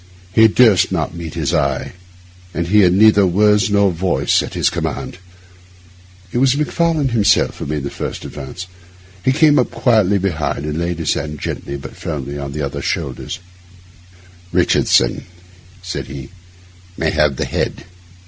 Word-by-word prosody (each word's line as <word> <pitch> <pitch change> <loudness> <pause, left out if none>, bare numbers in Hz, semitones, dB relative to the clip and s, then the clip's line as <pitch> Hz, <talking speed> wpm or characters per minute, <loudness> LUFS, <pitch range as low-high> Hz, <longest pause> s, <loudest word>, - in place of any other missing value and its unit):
He 110 +2 +7
durst 110 -4 +4
not - - -2
meet 85 -2 -7
his 80 -1 -1
eye, 70 -5 -1 0.6
and 85 - -1
he 105 +2 +5
had 90 -3 +5
neither 105 0 +5
words 105 +2 +3
nor 100 -1 +3
voice 90 +1 +1
at - - -7
his - - +2
command. - - -4 1.1
It 120 - -1
was 135 +1 +3
Macfarlane 155 -1 0
himself 105 -3 +2
who - - -5
made 75 -1 -3
the 70 - -4
first - - -6
advance. 75 +6 -7 0.6
He 130 - +3
came 150 +1 +4
up 125 - +1
quietly 110 -5 +2
behind 80 -6 -2
and 75 +1 -3
laid 85 0 -2
his 80 -3 0
hand 75 0 -5
gently 70 - -5
but 70 - -10
firmly 70 -1 -5
on 70 0 -5
the 75 0 -3
other's 70 - -4
shoulder. - - -3 1.2
'Richardson,' - - +2 0.6
said 90 - -5
he, 65 -2 -8 0.7
'may - - 0
have 75 -2 +2
the - - -2
head. - - -3
90 Hz, 160 wpm, -18 LUFS, 75-110 Hz, 1.2 s, He